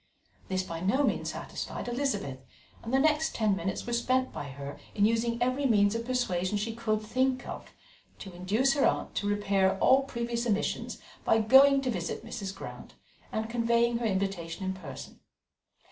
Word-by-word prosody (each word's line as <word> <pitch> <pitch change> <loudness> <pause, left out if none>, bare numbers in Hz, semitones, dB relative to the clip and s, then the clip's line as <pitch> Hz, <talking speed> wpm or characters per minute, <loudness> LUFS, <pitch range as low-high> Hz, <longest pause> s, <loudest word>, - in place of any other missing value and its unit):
This 185 0 -1
by 165 -2 -6
no 200 +11 +2
means - - 0
satisfied - - -6
Elizabeth, 240 - -2 0.4
and 230 - -6
the 265 - +4
next 310 +2 +2
ten 215 -3 +2
minutes 190 +1 -3
were 240 - -3
spent 255 +2 +1
by - - -5
her 140 +1 -8 0.2
in 205 - +4
using 230 +1 +1
every 255 +3 +1
means 205 -3 +4
of 230 0 -3
persuasion 205 -7 0
she 220 +2 -2
could 220 -2 -1
think 255 +4 0
of - - -7 0.5
to 190 - -9
induce 210 +10 +1
her 280 - +1
aunt - - +1
to 205 - 0
repair 195 -2 +2
all 265 +6 +5
previous 235 -2 -3
omissions 210 -2 -1 0.3
by 225 - +3
going 270 +5 +6
to 260 -2 -1
visit 175 -5 -4
Mrs. 195 -1 -5
Grant - - -9 0.4
and 220 0 -2
conveying 235 0 +2
her 240 - -2
invitation 190 -3 -2
in 190 - -1
person. 165 -8 -9
225 Hz, 175 wpm, -29 LUFS, 190-250 Hz, 0.5 s, going